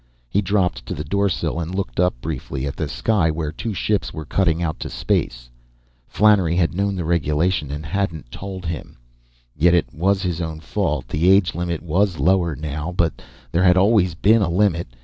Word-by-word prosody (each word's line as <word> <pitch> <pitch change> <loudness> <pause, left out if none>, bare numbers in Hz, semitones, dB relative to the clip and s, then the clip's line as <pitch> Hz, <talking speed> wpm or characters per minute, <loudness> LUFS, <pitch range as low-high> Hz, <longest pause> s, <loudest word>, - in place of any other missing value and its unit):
He 100 +11 +1
dropped 95 -2 0
to - - -3
the 75 - -4
doorsill 100 +1 -1
and 85 +3 -4
looked 95 -2 -3 0.2
briefly 70 -3 -4
up 70 - -2
at - - -19
the 80 - -2
sky 90 +2 +1
where 75 -1 -2
two 115 - -4
ships 105 +2 0
were 80 - -7
cutting 85 0 +1
out 80 -2 -2
to - - -5
space. - - -1 0.6
Flannery 100 -6 +3
had 85 -2 +1
known 100 +2 0
the 90 -3 -3
regulation 80 -1 +1
and 75 +2 -5
hadn't 80 -7 -3
told 95 -2 -7
him. 80 -4 -6 0.6
Yet 85 +3 +4
it 70 -9 0
was 95 +4 +1
his 90 -2 -2
own 80 -1 -4
fault; 80 -7 -2
the 80 +5 +2
age 95 -3 +4
limit 85 -1 -3
was 90 +2 +1
lower 90 -4 +2
now, 75 +3 -4
but 85 -7 -1 0.3
there 85 - +1
had 90 0 +5
always 95 -3 +3
been 110 +6 +4
a 95 - +1
limit. 85 -1 +1
85 Hz, 190 wpm, -21 LUFS, 80-95 Hz, 0.6 s, had